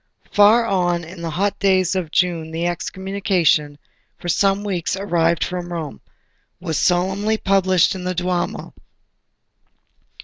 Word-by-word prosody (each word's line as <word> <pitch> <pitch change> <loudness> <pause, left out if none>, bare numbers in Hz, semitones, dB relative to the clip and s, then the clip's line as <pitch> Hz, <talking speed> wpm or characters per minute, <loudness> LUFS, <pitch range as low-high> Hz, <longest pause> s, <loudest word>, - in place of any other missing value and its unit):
Far 215 +3 +5
on 175 -5 0
in 170 +2 -10
the 165 - -3
hot 195 +5 -1
days 185 -2 +2
of 180 -4 -2
June 165 -1 0
the 165 +1 -3
Excommunication, 175 -4 0 0.4
for 175 - -6
some 195 +3 +2
weeks 190 -3 -2
arrived 170 -4 +1
from 180 -1 -5
Rome, 160 -4 -6 0.6
was 165 -3 -2
solemnly 190 +5 +1
published 190 -3 +2
in 185 -2 -7
the 185 0 -2
Duomo. 180 0 -2
180 Hz, 130 wpm, -20 LUFS, 170-195 Hz, 0.6 s, Far